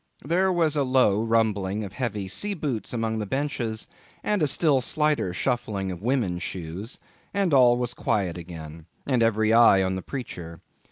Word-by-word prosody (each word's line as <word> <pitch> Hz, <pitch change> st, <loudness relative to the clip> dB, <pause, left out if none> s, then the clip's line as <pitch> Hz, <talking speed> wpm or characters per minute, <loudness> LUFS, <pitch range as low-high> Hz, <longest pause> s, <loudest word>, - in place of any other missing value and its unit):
There 185 Hz, +5 st, +2 dB
was 165 Hz, -4 st, +2 dB
a 145 Hz, -, +2 dB
low 130 Hz, -6 st, +3 dB
rumbling 110 Hz, -3 st, +1 dB
of 100 Hz, -2 st, -7 dB
heavy 105 Hz, -6 st, -3 dB
sea 205 Hz, -, -1 dB
boots 140 Hz, -, -3 dB
among 115 Hz, -2 st, -1 dB
the 105 Hz, -, -3 dB
benches, 125 Hz, -4 st, -2 dB, 0.4 s
and 210 Hz, -3 st, +1 dB
a 150 Hz, -, +3 dB
still 140 Hz, -2 st, +3 dB
slighter 150 Hz, -, +1 dB
shuffling 100 Hz, -2 st, -2 dB
of 90 Hz, -1 st, -7 dB
women's 110 Hz, -8 st, 0 dB
shoes, 90 Hz, -, -6 dB, 0.4 s
and 195 Hz, -5 st, +1 dB
all 125 Hz, -3 st, +6 dB
was 120 Hz, -1 st, -2 dB
quiet 95 Hz, -8 st, -1 dB
again, 80 Hz, -2 st, -9 dB, 0.2 s
and 130 Hz, -4 st, +1 dB
every 110 Hz, -1 st, +3 dB
eye 115 Hz, -5 st, +6 dB
on 95 Hz, 0 st, 0 dB
the 95 Hz, -, -4 dB
preacher. 85 Hz, -, -7 dB
115 Hz, 170 wpm, -25 LUFS, 95-135 Hz, 0.4 s, all